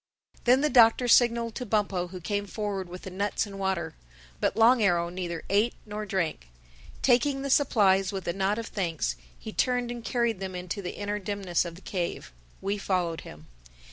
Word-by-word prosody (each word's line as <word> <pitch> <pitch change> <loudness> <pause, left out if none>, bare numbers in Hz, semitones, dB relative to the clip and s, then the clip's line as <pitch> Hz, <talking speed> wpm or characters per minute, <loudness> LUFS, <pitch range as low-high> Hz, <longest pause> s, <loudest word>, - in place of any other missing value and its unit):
Then 250 +2 +5
the 300 - +2
Doctor 240 0 +6
signaled 235 -1 +4
to 250 - -4
Bumpo 200 -5 0
who 185 +1 -8
came 205 +3 -2
forward 200 -3 -3
with 180 +1 -9
the 190 - -7
nuts 200 +4 -1
and 200 -1 -9
water. 190 -2 -1 0.5
But - - 0
Long 235 +2 +6
Arrow 175 -4 +2
neither 175 -2 -4
ate 210 +4 +2
nor 210 0 -5
drank. 170 - -2 0.5
Taking 270 +2 +3
the 275 - -2
supplies 195 -9 +4
with 195 -2 -5
a 170 - 0
nod 195 +2 0
of 230 - -3
thanks, 170 - -2 0.2
he - - -8
turned 245 -1 +1
and 240 -1 -6
carried 235 -5 0
them 190 -1 -5
into 180 +3 -4
the 180 - -6
inner 205 0 -2
dimness 195 -3 -1
of 170 -1 -6
the 180 - -13
cave. 175 - -4 0.3
We 200 +1 -1
followed 180 -4 -1
him. 75 +1 -12
200 Hz, 190 wpm, -28 LUFS, 180-230 Hz, 0.5 s, Doctor